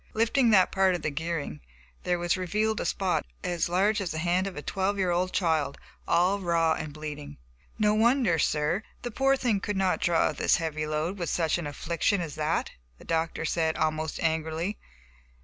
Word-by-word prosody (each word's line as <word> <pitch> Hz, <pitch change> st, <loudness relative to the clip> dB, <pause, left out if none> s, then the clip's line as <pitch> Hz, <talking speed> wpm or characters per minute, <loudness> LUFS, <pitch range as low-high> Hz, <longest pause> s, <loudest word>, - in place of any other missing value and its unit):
Lifting 230 Hz, +3 st, +3 dB
that 190 Hz, -4 st, +5 dB
part 190 Hz, -1 st, +3 dB
of 175 Hz, -, -6 dB
the 155 Hz, -, -1 dB
gearing, 155 Hz, -, -3 dB, 0.5 s
there 180 Hz, -, +1 dB
was 175 Hz, 0 st, +1 dB
revealed 210 Hz, +4 st, 0 dB
a -, -, -3 dB
spot 190 Hz, -2 st, 0 dB, 0.2 s
as 175 Hz, -1 st, -1 dB
large 200 Hz, +5 st, +2 dB
as 185 Hz, -, -2 dB
the 160 Hz, -, -4 dB
hand 175 Hz, +3 st, +1 dB
of 195 Hz, -, -6 dB
a 150 Hz, -, -5 dB
twelve 195 Hz, +1 st, -1 dB
year 185 Hz, -2 st, +1 dB
old 180 Hz, +1 st, 0 dB
child, 160 Hz, -6 st, 0 dB, 0.3 s
all 185 Hz, +4 st, +3 dB
raw 170 Hz, -3 st, +2 dB
and 155 Hz, -, -5 dB
bleeding. 150 Hz, -, -7 dB, 0.4 s
"No 210 Hz, -1 st, +3 dB
wonder, 230 Hz, -5 st, +3 dB
sir, 150 Hz, +6 st, +1 dB, 0.2 s
the 245 Hz, -, -4 dB
poor 270 Hz, +3 st, +2 dB
thing 235 Hz, -6 st, +1 dB
could 205 Hz, 0 st, -3 dB
not 190 Hz, -1 st, +1 dB
draw 170 Hz, -2 st, +2 dB
this -, -, +2 dB
heavy 155 Hz, -2 st, -2 dB
load, 155 Hz, +6 st, -2 dB
with 170 Hz, -, -2 dB
such 165 Hz, 0 st, +1 dB
an 165 Hz, -, -4 dB
affliction 170 Hz, +6 st, 0 dB
as 165 Hz, -4 st, -4 dB
that," 155 Hz, +2 st, -1 dB, 0.3 s
the -, -, -16 dB
doctor 165 Hz, 0 st, -1 dB
said, 160 Hz, 0 st, 0 dB
almost 155 Hz, 0 st, -1 dB
angrily. 160 Hz, +4 st, -1 dB
175 Hz, 190 wpm, -27 LUFS, 160-195 Hz, 0.5 s, that